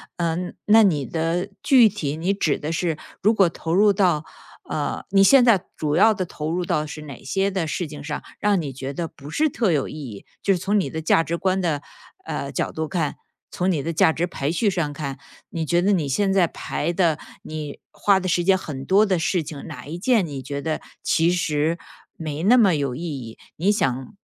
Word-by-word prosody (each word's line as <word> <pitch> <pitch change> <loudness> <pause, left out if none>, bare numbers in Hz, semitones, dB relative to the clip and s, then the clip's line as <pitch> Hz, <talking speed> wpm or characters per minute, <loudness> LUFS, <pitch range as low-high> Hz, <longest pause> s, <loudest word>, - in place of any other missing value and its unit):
嗯， 175 +1 -2
那 220 +1 +7
你 150 -9 +2
的 170 +4 -1
具 255 -6 +6
体， 155 -8 -3
你 175 +5 0
指 165 -7 0
的 150 - -4
是 165 -1 -1 0.2
如 215 +4 +4
果 195 -5 +4
投 165 0 -4
入 205 +2 +5
到 180 -6 +2 0.5
呃， 150 - -2
你 195 0 +4
现 270 +3 +7
在 220 -7 +5
主 150 -1 -1
要 220 +5 +6
的 185 -3 -3
投 155 -2 -5
入 180 +2 -1
到 155 -3 0
是 155 - -8
哪 140 -4 -10
些 195 +8 0
的 185 -4 -1
事 175 +3 -2
情 150 -1 -9
上， 150 0 -5 0.2
让 205 -4 +2
你 145 - -4
觉 135 +1 -6
得 165 +2 -3
不 145 +1 -12
是 305 - +1
特 220 -10 +1
有 140 - 0
意 - - -8
义 125 -10 -8 0.2
就 195 - +3
是 - - 0
从 200 +4 +1
你 - - -1
的 160 - -4
价 160 +1 +4
值 165 +1 -2
观 190 +2 0
的， 160 -5 0 0.4
呃， - - -4
角 - - -2
度 160 0 -3
看， 165 -5 -2 0.3
从 180 +1 0
你 150 -6 -1
的 165 +2 -2
价 160 - +4
值 165 +2 -1
排 145 -4 -3
序 205 +5 +1
上 165 -5 -1
看， 140 -2 -5 0.3
你 165 - -2
觉 175 0 +3
得 205 - +3
你 160 -6 0
现 195 +7 +1
在 185 -3 +4
排 170 - -3
的 170 -3 +1 0.2
你 155 -2 -6
花 200 -2 +3
的 185 - -4
时 175 -1 +1
间 190 +1 +4
很 145 -7 -6
多 200 +3 +5
的 185 -4 +1
事 170 0 0
情， 145 -1 -8
哪 - - -8
一 165 +4 -6
件 225 -2 +3
你 140 -4 -6
觉 140 +1 -5
得 155 0 -2 0.2
其 165 +1 +3
实 160 -2 0 0.4
没 155 -1 -4
那 240 +6 +6
么 200 -7 +5
有 140 -4 -1
意 160 - -6
义， 130 -9 -6 0.2
你 190 +6 +2
想 135 - -1
170 Hz, 240 characters per minute, -23 LUFS, 150-190 Hz, 0.5 s, 那